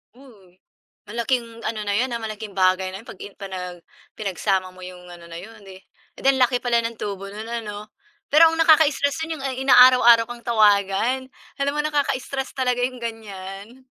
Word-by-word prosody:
Mm, 205 -9 -19 0.5
malaking 235 +1 -1 0.2
ano 220 -1 -3
na 205 - -1
'yon, 245 +6 +1
ah, 235 - -3
malaking 215 -1 -7
bagay 185 0 +2
na 190 +2 -8
'yon 230 - -21
'pag - - -11
in 200 - -10
panag 185 -3 -7 0.4
pinagsama 190 -2 -1
mo 185 - -15
yung 180 0 -10
ano 175 -1 -13
na 165 - -8
'yon, 210 +5 -12
eh, 190 0 -14 0.3
eh, - - -11
di - - -1
ang 260 - -1
laki 250 0 +3
pala 240 -1 +1
ng 230 -1 -5
tubo 195 -1 -5
no'n 210 +2 -8 0.2
ano. 210 0 -9 0.4
Pero 310 +3 +7
ang 325 - -3
nakaka-istress 315 -1 +3
nun 320 -3 -6
yung - - -8 0.2
inaaraw-araw 250 -3 +7
kang 240 -1 -9
tawagan 215 +3 +2 0.3
alam 280 0 0
mo 295 - 0
nakaka-istress 275 -3 -2
talaga 250 -2 0
yung 255 -1 -7
gan'yan. 215 +1 -8
225 Hz, 185 wpm, -22 LUFS, 195-255 Hz, 0.5 s, Pero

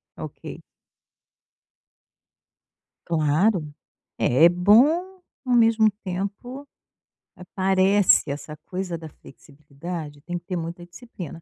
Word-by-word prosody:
Ok. - - -9 2.5
Claro. 155 +1 +1 0.4
É 155 +8 +5
bom, 285 - +3 0.2
ao 250 - 0
mesmo 225 -2 +4
tempo, 200 +9 -6 0.7
aparece 190 0 +2
essa 150 +2 -6
coisa 180 -2 -4
da 160 -1 -10
flexibilidade, 145 +2 -10
tem 175 +3 -5
que 175 - -12
ter 180 -1 -4
muita 170 +1 -6
disciplina. 175 - -10
180 Hz, 90 wpm, -23 LUFS, 160-210 Hz, 2.5 s, É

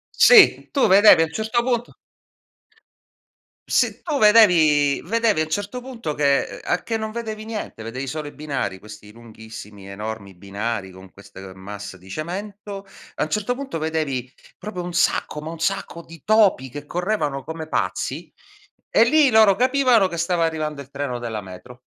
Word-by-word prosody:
Sì, 485 -3 +6
tu 275 - +2
vedevi 195 -3 +7
a - - +1
un 160 - -11
certo 220 +4 -1
punto 240 -1 -2 1.7
se - - +1
tu 300 -5 -2
vedevi 165 - +5
vedevi 225 -2 +1
a - - +3
un - - -14
certo 205 +8 -3
punto 240 - -6
che, 140 -1 +2
ehm, - - -9
a 175 - -1
che 225 - -2
non 220 0 -4
vedevi 220 -2 -5
niente, 215 - -6
vedevi 130 +4 -6
solo 150 +2 -5
i - - -10
binari, 140 -10 -4
questi 105 0 -13
lunghissimi, 110 -3 -12
enormi 100 0 -7
binari 100 +1 -4
con 95 0 -15
queste, 100 -1 -14
ehm, 95 -1 -11
masse 100 0 -8
di 95 +1 -17
cemento, 195 - -6 0.3
a - - -1
un 155 - -4
certo 215 +7 -1
punto 270 -9 -5
vedevi 155 -6 -2 0.3
proprio 195 -4 -6
un 175 - -5
sacco, 160 -2 0
ma 155 +1 -7
un 165 - -8
sacco 170 0 -2
di 165 -1 -14
topi 210 - +3
che 145 +3 -9
correvano 160 -6 -2
come 160 0 -7
pazzi 135 - -3 0.6
e 230 - +5
lì 300 +2 +4
loro 220 -4 +5
capivano 255 -5 +3
che 170 - -6
stava 170 0 0
arrivando 155 -3 -2
il 135 - -13
treno 140 -3 -4
della 115 -2 -4
metro. 120 +7 -13
160 Hz, 175 wpm, -22 LUFS, -, 1.7 s, vedevi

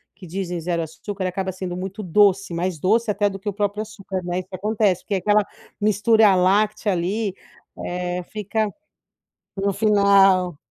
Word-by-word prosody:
que 190 0 -12
dizem 180 0 -4
0 170 0 -1
açúcar 185 +4 -5
acaba 190 +1 -2
sendo 185 -1 -5
muito 190 +3 -5
doce, 195 0 +3
mais 175 -1 -2
doce 220 +6 +2
até 205 0 +1
do 195 - -6
que 195 +2 -4
o - - -4
próprio 205 +1 -1
açúcar, 195 -3 -6
né, 175 +1 -2
isso 185 - -8
acontece, 205 -1 +1
porque 200 - -2
aquela 210 +3 +3 0.4
mistura 210 0 +4
láctea 205 +3 +2
ali, 190 +3 -1 0.5
eh, 180 0 -3
fica 215 +1 -1 0.9
no 200 0 0
final. 195 -4 +4
195 Hz, 155 wpm, -22 LUFS, 180-210 Hz, 0.9 s, mistura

